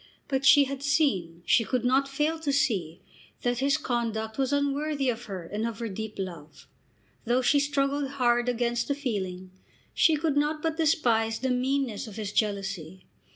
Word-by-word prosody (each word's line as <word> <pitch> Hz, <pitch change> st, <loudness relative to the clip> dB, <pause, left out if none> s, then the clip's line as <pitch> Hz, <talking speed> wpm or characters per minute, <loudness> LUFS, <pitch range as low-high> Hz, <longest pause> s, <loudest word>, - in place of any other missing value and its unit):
But 270 Hz, -1 st, -1 dB
she 285 Hz, -, +8 dB
had 275 Hz, 0 st, -5 dB
seen, 195 Hz, -, 0 dB
she 230 Hz, -, +4 dB
could 245 Hz, +1 st, -1 dB
not 265 Hz, +2 st, +3 dB
fail 300 Hz, +4 st, -1 dB
to 300 Hz, -3 st, -1 dB
see, 190 Hz, -, 0 dB, 0.4 s
that 245 Hz, -1 st, 0 dB
his 280 Hz, +2 st, +2 dB
conduct 230 Hz, -4 st, -2 dB
was 265 Hz, 0 st, +1 dB
unworthy 285 Hz, 0 st, 0 dB
of 240 Hz, 0 st, -3 dB
her 190 Hz, -4 st, -6 dB
and 210 Hz, +5 st, -4 dB
of 230 Hz, -2 st, -5 dB
her 230 Hz, -1 st, -4 dB
deep 215 Hz, +2 st, -6 dB
love. 165 Hz, -6 st, -7 dB, 0.6 s
Though 245 Hz, +2 st, +2 dB
she 285 Hz, +3 st, +4 dB
struggled 280 Hz, 0 st, 0 dB
hard 240 Hz, -2 st, +2 dB
against 240 Hz, 0 st, 0 dB
the 280 Hz, -, 0 dB
feeling, 190 Hz, -9 st, -4 dB, 0.4 s
she 320 Hz, -, +4 dB
could 300 Hz, -1 st, 0 dB
not 300 Hz, +1 st, 0 dB
but 320 Hz, -1 st, -1 dB
despise 235 Hz, -9 st, +2 dB
the 260 Hz, 0 st, -1 dB
meanness 255 Hz, -3 st, -1 dB
of 210 Hz, -, -10 dB
his 210 Hz, -2 st, -4 dB
jealousy. 195 Hz, -5 st, -2 dB
245 Hz, 175 wpm, -27 LUFS, 215-280 Hz, 0.6 s, she